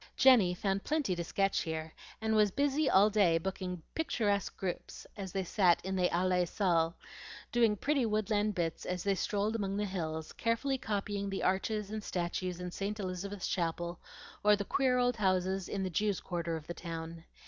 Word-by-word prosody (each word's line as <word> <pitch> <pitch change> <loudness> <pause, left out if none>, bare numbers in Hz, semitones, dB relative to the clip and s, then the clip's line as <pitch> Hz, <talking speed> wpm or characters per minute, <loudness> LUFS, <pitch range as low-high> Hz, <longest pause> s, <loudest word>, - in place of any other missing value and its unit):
Jenny 220 -10 +6
found 195 +1 -1
plenty 290 - 0
to 170 - -2
sketch 195 +3 +1
here, 160 -1 -4 0.3
and 220 0 +1
was 210 -1 +5
busy 285 +5 +1
all 205 +3 +5
day 195 -6 +4
booking 180 -1 -4
picturesque 210 -10 0
groups 185 -2 -5
as 195 -3 -6
they 195 0 -1
sat 180 -2 +3
in 190 0 -2
the 180 -1 +2
Allee 180 0 +2
Saal, 170 -4 +1 0.6
doing 230 -3 +4
pretty 275 +2 +1
woodland 210 -1 +1
bits 165 -2 -2
as 180 -1 -2
they 200 - +2
strolled 205 +3 -1
among 200 -2 -1
the 210 - 0
hills, 160 -5 -4
carefully 255 +4 0
copying 200 -2 -2
the 195 - -3
arches 205 +2 0
and 215 -1 -4
statues 180 0 -2
in 180 0 -5
St. 205 +3 -3
Elizabeth's 190 +1 -4
Chapel, 170 0 -2 0.4
or 210 0 +6
the 200 0 -4
queer 255 +1 +2
old 245 -1 +2
houses 190 -1 +1
in 195 -1 -2
the 185 - -2
Jews' 205 +2 +1
Quarter 170 -2 -3
of 160 -2 -7
the 170 - -5
town. 165 -1 -7
195 Hz, 180 wpm, -32 LUFS, 175-210 Hz, 0.6 s, Jenny